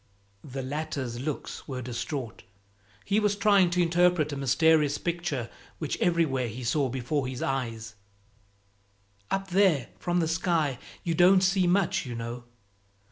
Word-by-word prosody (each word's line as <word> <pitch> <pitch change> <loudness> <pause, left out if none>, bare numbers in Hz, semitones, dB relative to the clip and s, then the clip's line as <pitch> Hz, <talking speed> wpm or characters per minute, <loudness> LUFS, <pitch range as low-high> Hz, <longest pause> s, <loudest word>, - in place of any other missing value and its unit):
The 135 -1 -6
latter's 135 -3 -4
looks 145 +2 -5
were 130 -3 -5
distraught; 125 0 -5 0.6
he 205 - +2
was 210 -1 +1
trying 200 -3 +4
to 180 +1 +1
interpret 170 -3 +2
a - - -2
mysterious 145 +2 +3
picture 170 -8 -2 0.3
which 155 -3 -3
everywhere 155 -8 +1
he 120 +3 -7
saw 135 +3 +1
before 130 +2 -2
his 130 -1 -5
eyes 115 -5 -3 1.4
"Up 195 -1 -2
there, 180 - +3
from 175 0 0
the 165 - +1
sky, 165 -5 0 0.2
you 170 - 0
don't 180 +3 +6
see 190 -1 +2
much, 195 +3 +2
you 120 - -5
know. 120 +1 -6
150 Hz, 140 wpm, -27 LUFS, 130-175 Hz, 1.4 s, don't